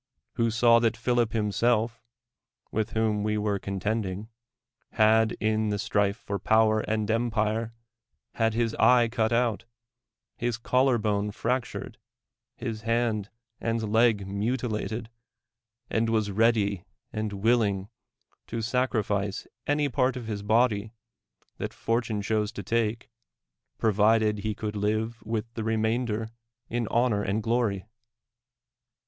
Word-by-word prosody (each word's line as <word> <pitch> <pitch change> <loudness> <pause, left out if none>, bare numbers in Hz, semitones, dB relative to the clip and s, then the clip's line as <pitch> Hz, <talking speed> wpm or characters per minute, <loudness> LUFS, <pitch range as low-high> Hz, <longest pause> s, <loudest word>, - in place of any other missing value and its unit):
— - - -55
who 115 0 +2
saw 115 +1 +5
that 115 -1 +1
Philip 120 -1 +1
hi^iiself, 115 +2 +1 0.7
with 110 -1 -2
whom 110 -2 +1
we 105 0 0
were 105 -1 0
ccmtending, 100 +1 -3 0.6
had, 110 0 +4
in 110 0 0
the 105 - 0
strife 100 0 +1
for 100 -3 -4
power 110 +2 +3
and 110 -1 -1
empirr\ 110 -1 0 0.6
had 115 -1 +1
his 115 -1 +1
eye 120 -2 +6
cut 110 -1 0
out, 115 -2 +1 0.7
his 120 -2 -2
collar 125 +1 +2
bone 105 -1 0
fractured, 120 +3 -3 0.6
his 110 -1 -5
hand 115 -2 0 0.3
and 115 -2 -2
leg 110 -3 +4
mutilated, 110 +1 -2 0.8
and 115 0 0
was 110 -2 +1
ready 105 -3 +2 0.3
and 110 -1 -2
willing 100 -2 +1 0.6
to 115 0 -4
sacrifice 105 -5 0 0.2
any 145 0 +2
part 130 -1 +1
of 120 - -6
his 105 -2 -4
body 110 0 +1 0.6
that - - -4
fortune 115 -3 -1
chose 105 0 0
to 100 - -6
take, 115 +1 -1 0.7
provided 110 0 +3
he 110 0 -2
could 105 0 -4
live 110 +2 -1
with 110 0 -2
iho 110 - -3
remainder 110 0 0 0.4
in 120 -1 -1
honor 115 -3 +2
and 105 +2 -1
glory? 110 -5 0
110 Hz, 125 wpm, -27 LUFS, 105-115 Hz, 0.8 s, eye